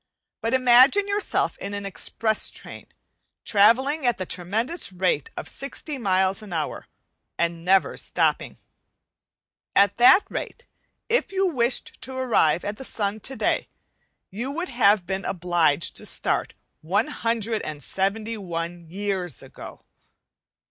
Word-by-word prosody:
But 230 +3 +1
imagine 255 +10 +6
yourself 405 +1 0
in 200 - -5
an 200 0 -5
express 220 +2 0
train, - - -11 0.6
travelling 255 +9 +3
at 240 -2 +2
the 185 - -4
tremendous 220 - -2
rate 180 -5 0
of - - -5
sixty 275 - -6
miles 190 -1 +1
an 210 -3 -11
hour 160 -2 -3 0.5
and 170 0 -1
never 190 +2 +3
stopping. - - 0 1.2
At 200 0 +4
that 245 +11 +7
rate, - - -6 0.4
if 470 -2 +1
you 390 0 +1
wished 255 -8 -1
to 260 - -7
arrive 220 -11 +2
at 205 +1 -3
the 265 - -8
sun 210 -4 0
today 230 -1 -1 0.6
you 235 +7 -4
would 340 +6 -4
have 210 -6 +3
been 190 +2 -3
obliged 170 -4 +1
to - - -4
start - - -1 0.3
171 195 - -2
years 190 - -3
ago. - - -12
205 Hz, 120 wpm, -24 LUFS, 185-250 Hz, 1.2 s, that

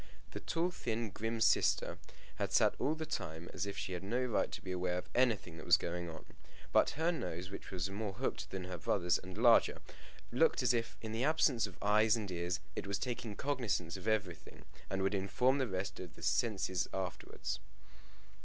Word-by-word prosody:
The - - -5
tall 170 +2 0
thin 115 - -2
grim 115 +4 -2
sister 110 - +3 0.4
had - - -1
sat - - +5
all 155 - +1
the 160 0 -4
time 80 - -4
as 95 +3 -2
if 100 - -5
she 95 - -3
had 90 - -3
no 120 +6 0
right 120 -4 +1
to - - -4
be 95 - -4
aware 90 0 0
of 90 - -4
anything 110 -9 +2
that 80 - -8
was - - +8
going 85 0 -3
on, 80 -1 -9 0.5
but - - +4
her 165 +2 +3
nose, 90 - -4
which 100 - -7
was 95 +1 -2
more 100 0 -3
hooked 125 +7 -2
than 95 -1 -4
her 90 -1 -5
brother's, 90 +1 +2
and 95 +1 -9
larger, 120 0 +5 0.5
looked - - +3
as - - +4
if, 115 -1 -1
in 110 - -4
the 115 +3 -1
absence 140 -7 +3
of 90 -5 -13
eyes 105 +2 +5
and 105 -4 -4
ears, 85 0 -1 0.2
it - - -4
was 100 0 0
taking 120 -2 -3
cognizance 110 - -1
of 95 +2 -7
everything, 100 -7 -2 0.2
and 95 0 -1
would 95 +1 +2
inform 125 +8 +2
the 130 - +1
rest 95 -1 -3
of 90 -4 -8
the 85 - -12
senses 95 +1 +1
afterwards. 95 -2 -4
100 Hz, 200 wpm, -35 LUFS, 90-115 Hz, 0.5 s, was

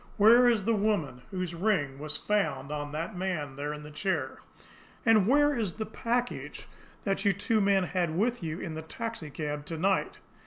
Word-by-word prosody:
"Where 235 +4 +7
is 225 -5 +2
the 230 - +3
woman 200 - 0
whose 185 -2 -3
ring 165 -7 0
was 155 +1 -1
found 205 -8 -1
on 145 -1 -4
that 165 +7 -4
man 175 -7 -3
there 145 +2 -3
in 150 0 -7
the 150 - -10
chair? 150 -5 -2 0.7
And 215 -4 +5
where 290 +3 +4
is 215 -8 -2
the 220 0 -3
package 240 +3 -3 0.4
that 195 -1 0
you 200 -2 +4
two 215 +3 +1
men 195 -1 +3
had 175 -3 -1
with 240 +4 +1
you 165 0 -4
in 165 - -5
the 160 - -5
taxicab 155 -6 -5
to 165 +1 -3
night?" 190 +3 +1
185 Hz, 185 wpm, -29 LUFS, 155-215 Hz, 0.7 s, Where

